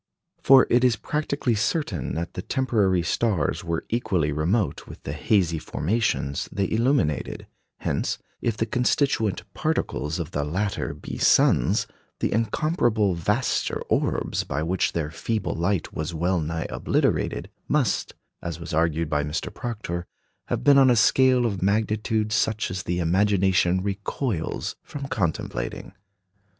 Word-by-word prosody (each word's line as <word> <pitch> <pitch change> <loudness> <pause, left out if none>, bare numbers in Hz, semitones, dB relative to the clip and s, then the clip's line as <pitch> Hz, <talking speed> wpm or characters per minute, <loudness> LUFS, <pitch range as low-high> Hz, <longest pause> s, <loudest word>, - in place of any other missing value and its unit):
For 135 -1 +7
it 120 +1 +4
is 125 -3 +4
practically 140 -3 -1
certain 110 - -1
that 85 +1 -4
the - - -4
temporary 105 -8 +1
stars 95 -6 0
were 85 -1 -2
equally 100 -10 0
remote 85 +8 0
with - - -11
the 70 - -4
hazy 85 0 +1
formations 75 - -1
they 100 0 0
illuminated; 115 - 0 0.4
hence, - - -1 0.2
if 115 -2 -1
the 110 - +1
constituent 120 -2 +1
particles 85 - -1
of 85 -4 -4
the 75 - -1
latter 95 +7 -2
be - - -7
suns, - - +4 0.3
the - - 0
incomparably 115 - +1
vaster 105 +9 0
orbs - - 0
by 75 +3 -2
which 90 +3 0
their 75 -2 -2
feeble 110 +5 -2
light 90 +2 -1
was 80 +2 -4
well 90 +3 +1
nigh 80 +1 -3
obliterated - - 0 0.2
must, - - 0 0.3
as 85 -1 -5
was 85 -1 -7
argued 80 0 +1
by 75 -1 0
Mr. 75 +2 -3
Proctor, 105 -8 -4 0.4
have - - -2
been 140 -1 +7
on 135 -1 +6
a 125 - +5
scale 130 +3 +4
of 100 -5 -2
magnitude 105 +2 0
such 110 0 0
as 90 0 -3
the 90 0 -2
imagination 95 0 +2
recoils 100 - -3
from 140 -1 -7
contemplating. 85 - -3
95 Hz, 140 wpm, -25 LUFS, 85-115 Hz, 0.4 s, For